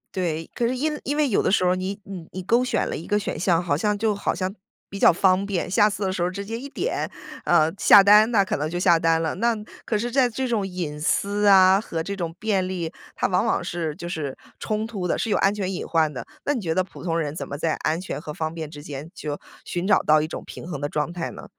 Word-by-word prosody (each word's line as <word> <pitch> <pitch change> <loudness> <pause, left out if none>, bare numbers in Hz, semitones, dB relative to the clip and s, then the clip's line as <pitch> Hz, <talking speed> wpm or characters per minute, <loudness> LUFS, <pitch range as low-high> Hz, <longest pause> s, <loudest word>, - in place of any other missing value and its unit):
对， 165 -3 -2
可 240 - 0
是 250 +2 0
因 300 +3 -1
因 290 +2 -2
为 300 -1 +3
有 225 - +1
的 - - +2
时 185 - +3
候 180 0 +3
你 190 +2 -4
你 185 -4 -8
你 185 - -5
勾 235 +6 +3
选 255 - 0
了 - - -3
一 165 - -7
个 205 - +1
选 205 - -4
项， 170 0 +2
好 175 -5 0
像 210 +6 0
就 215 0 +1
好 200 - -1
像 190 +1 -3 0.3
比 200 - -7
较 - - +6
方 185 +2 +2
便， 195 -4 -2
下 210 +2 +4
次 200 0 -4
的 190 - -1
时 180 - -1
候 175 - +1
直 200 +2 -6
接 225 +2 -4
一 275 +4 -7
点， 425 - -2 0.3
呃， 160 -2 +4
下 200 - +8
单， 210 +3 +6
那 200 -4 +4
可 - - -1
能 150 +2 -2
就 175 +2 -3
下 175 -2 +5
单 165 0 +2
了。 160 - -1
那 235 +4 +2 0.3
可 215 - 0
是 235 +3 -2
在 255 0 +3
这 260 +3 -2
种 225 -5 0
隐 175 -6 -4
私 205 +5 +1
啊 190 0 +7
和 165 -7 -4
这 200 +5 -4
种 170 -4 -4
便 205 -4 +1
利， 180 -3 -3 0.2
它 - - 0
往 185 +4 +1
往 225 - +1
是 170 -3 -3
就 170 - -6
是 155 -6 -3 0.2
冲 215 +1 -2
突 205 -6 -4
的、 180 - 0
是 - - -2
有 205 - +2
安 195 - +3
全 195 -3 -2
隐 - - -4
患 160 -2 +1
的。 130 - -6 0.2
那 290 - +2
你 250 - -3
觉 165 -4 -1
得 185 - +2
普 185 - -9
通 165 -2 0
人 150 -2 -3
怎 - - -4
么 140 - -6
在 160 +1 0
安 160 +2 +1
全 180 -4 -5
和 150 - -7
方 160 +1 -3
便 160 -2 -6
之 145 -2 -9
间 145 +2 -8
就 145 -1 -5 0.3
寻 175 0 -3
找 205 +1 +5
到 155 0 +4
一 155 - -2
种 - - -5
平 - - -9
衡 160 -5 -5
的 145 - -2
状 150 +3 -2
态 170 -1 -4
呢？ - - -10
185 Hz, 295 characters per minute, -24 LUFS, 165-210 Hz, 0.3 s, 下